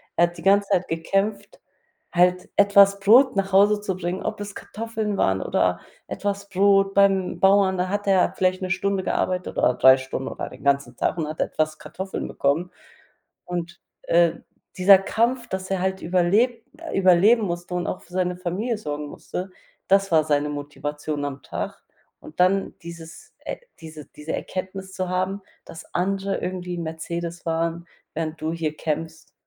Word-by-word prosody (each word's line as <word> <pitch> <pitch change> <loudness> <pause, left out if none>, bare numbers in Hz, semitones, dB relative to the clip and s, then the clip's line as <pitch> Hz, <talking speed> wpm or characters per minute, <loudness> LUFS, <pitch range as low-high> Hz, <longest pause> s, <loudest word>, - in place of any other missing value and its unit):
Er 175 - +4
hat 175 0 -13
die - - -9
ganze 200 +1 +4
Zeit 180 - +1
gekämpft, 195 +5 -2 0.5
halt 180 +1 +2
etwas 200 -1 +6
Brot 245 +6 +6
nach 195 0 -1
Hause 205 +2 +4
zu 190 -3 -3
bringen, 180 +1 -3
ob - - -3
es 205 -1 -7
Kartoffeln 220 -2 -4
waren 95 - +1
oder - - 0 0.3
etwas 200 0 -3
Brot 195 0 +3
beim 195 -2 +2
Bauern. 195 -1 +4
Da 180 +1 -1
hat 205 +1 -2
er 190 -2 +3
vielleicht 185 0 +1
1 185 - -3
Stunde 190 +1 0
gearbeitet 185 -1 -2
oder 125 - +3
3 130 +1 +6
Stunden 130 0 -5
oder - - -6
den - - -14
ganzen 140 -3 +1
Tag 160 - -1
und 160 -3 -2
hat 155 +1 -4
etwas 155 0 -1
Kartoffeln 190 +5 -6
bekommen. 160 +6 0 0.7
Und, 175 0 -5 0.2
äh, 170 -1 +3 0.4
dieser 190 +1 +7
Kampf, 235 +5 0
dass 190 -2 -5
er 190 -2 0
halt 190 0 -1
überleb 200 +8 +2 0.3
überleben 195 +5 +5
musste 175 -2 -4
und 175 -1 -1
auch - - -4
für 175 - -20
seine 180 -1 0
Familie 195 +6 -2
sorgen 150 -5 -5
musste, 180 +5 -6 0.4
das 195 0 +3
war 155 -1 +5
seine 150 -1 +1
Motivation 145 0 -4
am 140 -1 -5
Tag. - - -6 0.4
Und 155 - -10
dann 190 +2 +2
dieses 170 -1 -11
e - - -4 0.2
diese 155 -2 -10
diese 150 +2 -8
Erkenntnis 190 0 -5
zu 185 -1 -3
haben, 185 +2 -1 0.2
dass 165 - -12
andere 195 +2 -1
irgendwie 180 -1 -4
Mercedes 170 +1 -5
fahren, 165 +1 -2 0.3
während 160 0 -4
du 155 +1 -2
hier 160 -2 -3
kämpfst, 160 +1 -4
180 Hz, 165 wpm, -23 LUFS, 165-195 Hz, 0.7 s, dieser